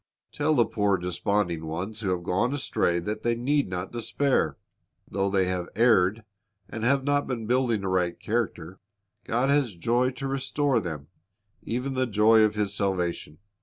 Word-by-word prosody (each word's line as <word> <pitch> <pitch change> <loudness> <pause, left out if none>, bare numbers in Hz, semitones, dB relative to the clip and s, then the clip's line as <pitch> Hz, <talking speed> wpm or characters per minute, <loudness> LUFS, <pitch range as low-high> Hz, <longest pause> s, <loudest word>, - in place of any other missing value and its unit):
Tell 150 +1 +1
the 120 -4 +4
poor 100 -2 +1
desponding 90 -1 -1
ones 95 +7 -4
who 105 -3 -2
have 90 -1 -1
gone 95 +10 0
astray 90 -10 0
that 105 +5 -3
they 120 0 +1
need 140 +1 0
not 90 +1 -4
despair. 120 +4 0 0.5
Though 100 +1 -1
they 95 -1 +2
have 90 -1 -2
erred, 110 -2 +3 0.4
and 110 - -6
have 135 +3 +2
not 145 +1 +1
been 120 -4 -3
building 120 -3 +1
a - - -2
right 90 -2 0
character, 95 -6 -3 0.5
God 125 +4 +1
has 140 -9 +1
joy 120 +8 +1
to 135 +2 -5
restore 135 0 0
to - - +2
them, 80 -5 -6 0.5
even 125 +4 -3
the 130 0 0
joy 110 +1 +5
of 105 -1 +3
His 105 -2 -1
salvation. 90 -6 -2
110 Hz, 170 wpm, -26 LUFS, 90-125 Hz, 0.5 s, joy